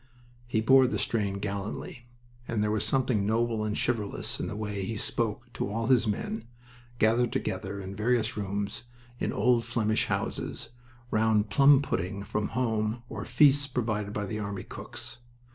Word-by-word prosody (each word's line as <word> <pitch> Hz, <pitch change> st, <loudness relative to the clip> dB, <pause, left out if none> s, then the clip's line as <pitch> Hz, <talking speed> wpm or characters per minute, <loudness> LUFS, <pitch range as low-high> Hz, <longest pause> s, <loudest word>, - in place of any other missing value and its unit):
He 110 Hz, -2 st, +1 dB
bore 130 Hz, +3 st, +6 dB
the 110 Hz, -, -1 dB
strain 100 Hz, -1 st, 0 dB
gallantly, 100 Hz, +4 st, -5 dB, 0.4 s
and 110 Hz, -3 st, 0 dB
there 105 Hz, -, +1 dB
was 105 Hz, -1 st, 0 dB
something 125 Hz, -6 st, +1 dB
noble 110 Hz, +1 st, +1 dB
and 105 Hz, 0 st, -1 dB
chivalrous 110 Hz, -5 st, -1 dB
in -, -, -2 dB
the -, -, -4 dB
way 105 Hz, -2 st, -3 dB
he 110 Hz, +3 st, -3 dB
spoke 115 Hz, +2 st, -2 dB
to -, -, -2 dB
all 115 Hz, +2 st, -1 dB
his 125 Hz, -3 st, +4 dB
men, 110 Hz, +2 st, -2 dB, 0.5 s
gathered 115 Hz, +2 st, +3 dB
together 100 Hz, -, -3 dB
in 95 Hz, 0 st, -6 dB
various 115 Hz, +2 st, +1 dB
rooms 100 Hz, +2 st, -3 dB, 0.3 s
in -, -, 0 dB
old 120 Hz, -2 st, +3 dB
Flemish 115 Hz, -2 st, +1 dB
houses, -, -, -3 dB, 0.4 s
round 110 Hz, -1 st, +2 dB
plum 140 Hz, 0 st, +6 dB
pudding 100 Hz, -4 st, -2 dB
from 105 Hz, 0 st, -1 dB
home 110 Hz, -1 st, 0 dB
or -, -, -5 dB
feasts 145 Hz, -1 st, +5 dB
provided 110 Hz, -6 st, -1 dB
by 105 Hz, 0 st, -2 dB
the 105 Hz, +2 st, -4 dB
army 100 Hz, -2 st, -4 dB
cooks. -, -, -8 dB
110 Hz, 160 wpm, -29 LUFS, 105-120 Hz, 0.5 s, bore